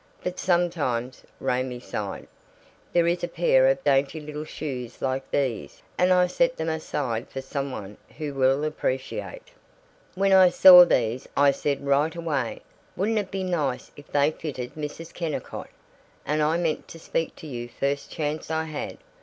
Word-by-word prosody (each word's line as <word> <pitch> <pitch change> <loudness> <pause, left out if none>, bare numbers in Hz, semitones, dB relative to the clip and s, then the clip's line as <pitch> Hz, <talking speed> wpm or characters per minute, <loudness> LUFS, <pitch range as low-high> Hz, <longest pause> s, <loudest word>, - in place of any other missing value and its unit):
"But 180 0 -4
sometimes," 160 -9 0 0.2
Raymie 125 0 -1
sighed, 105 -5 -5 0.7
"there 170 -1 +3
is 175 +1 0
a - - +1
pair 165 -6 +3
of 135 0 +1
dainty 140 +2 +2
little 150 0 -6
shoes 130 -6 -6
like 135 0 -2
these, 115 - -2
and 180 +1 +3
I 180 0 +5
set 255 +8 +1
them 160 0 -2
aside 135 -7 -3
for 135 - -5
some 140 +1 -4
one 105 -4 -7 0.2
who 150 -2 -4
will 135 +1 +2
appreciate. 150 - -3 0.7
When 195 +1 +3
I 190 -1 +8
saw 180 0 +10
these 120 -4 0
I 140 0 +6
said 140 0 -2
right 145 +4 +2
away, 150 -8 -2 0.3
'Wouldn't 215 +3 +1
it 200 -2 -4
be 195 -1 -3
nice 155 -8 -2
if 145 - -14
they 145 +1 +3
fitted 130 -6 -6
Mrs. 155 +2 -7
Kennicott,' 165 -4 -5 0.6
and 150 +1 0
I 155 +2 +2
meant 165 -3 -1
to 165 - -11
speak 165 0 -2
to - - -12
you 120 -5 -6
first 140 +3 -2
chance 155 0 -3
I 160 0 0
had. 155 -2 -5
150 Hz, 165 wpm, -25 LUFS, 135-170 Hz, 0.7 s, saw